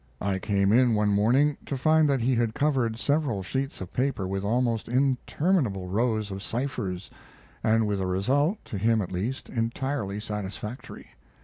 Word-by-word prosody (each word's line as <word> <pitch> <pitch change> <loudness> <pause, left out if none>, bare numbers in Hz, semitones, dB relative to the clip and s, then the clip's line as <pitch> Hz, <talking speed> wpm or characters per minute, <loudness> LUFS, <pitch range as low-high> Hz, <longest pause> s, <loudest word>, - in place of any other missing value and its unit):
I 95 -1 -1
came 100 0 +1
in 120 0 +4
one 105 0 +2
morning, 125 +9 +3
to 140 - -2
find 155 +2 +4
that 135 -3 +2
he 130 +3 +2
had 115 -2 0
covered 130 -7 +1
several 130 -4 0
sheets 135 +6 -3
of 95 - -7
paper 125 -7 0
with 95 +1 -3
almost 115 +1 0
interminable 130 - +1
rows 110 0 0
of 95 0 -5
ciphers, 105 -6 -3 0.5
and 110 0 +3
with 100 -2 -1
a 95 - -1
result, 140 - +1
to 100 - -5
him 110 +1 +2
at 90 - -7
least, 105 +9 -3
entirely 115 -2 -2
satisfactory. 105 +3 -6
115 Hz, 165 wpm, -27 LUFS, 100-135 Hz, 0.5 s, in